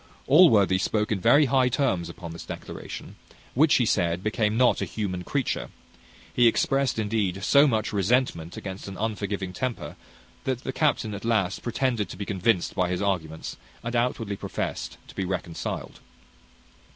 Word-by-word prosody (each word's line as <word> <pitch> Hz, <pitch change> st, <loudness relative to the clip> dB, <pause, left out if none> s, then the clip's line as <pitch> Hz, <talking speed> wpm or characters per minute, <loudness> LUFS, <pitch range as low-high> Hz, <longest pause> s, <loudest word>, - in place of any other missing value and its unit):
Allworthy 110 Hz, -, +6 dB
spoke 105 Hz, +3 st, 0 dB
in 105 Hz, -, +1 dB
very 135 Hz, +9 st, +5 dB
high 130 Hz, -1 st, +3 dB
terms 120 Hz, -, 0 dB
upon 85 Hz, 0 st, -8 dB
this 85 Hz, -, -8 dB
declaration, -, -, -8 dB, 0.4 s
which, 150 Hz, +4 st, +4 dB
he 125 Hz, -, +3 dB
said, 90 Hz, -3 st, +1 dB
became 110 Hz, 0 st, 0 dB
not 125 Hz, 0 st, +4 dB
a -, -, 0 dB
human 95 Hz, -5 st, -3 dB
creature. 135 Hz, +6 st, -2 dB, 0.6 s
He 120 Hz, -1 st, +5 dB
expressed, 135 Hz, +2 st, +2 dB
indeed, 100 Hz, -3 st, -1 dB
so 140 Hz, +6 st, +6 dB
much 110 Hz, -4 st, 0 dB
resentment 100 Hz, -5 st, 0 dB
against 95 Hz, 0 st, -7 dB
an 95 Hz, -1 st, -7 dB
unforgiving 100 Hz, -3 st, -3 dB
temper, 130 Hz, +3 st, -4 dB, 0.5 s
that 130 Hz, -1 st, -2 dB
the 130 Hz, -, -3 dB
captain 130 Hz, -8 st, +1 dB
at 100 Hz, -, -6 dB
last 105 Hz, -5 st, 0 dB
pretended 120 Hz, -4 st, -1 dB
to -, -, -8 dB
be 100 Hz, -, -4 dB
convinced 95 Hz, -1 st, +1 dB
by 90 Hz, -2 st, 0 dB
his 90 Hz, -, -1 dB
arguments, 80 Hz, -5 st, -2 dB, 0.3 s
and 120 Hz, +1 st, -3 dB
outwardly 115 Hz, -4 st, 0 dB
professed -, -, -4 dB
to -, -, -12 dB
be 95 Hz, -, -2 dB
reconciled. 90 Hz, -2 st, -4 dB
105 Hz, 160 wpm, -26 LUFS, 95-125 Hz, 0.6 s, Allworthy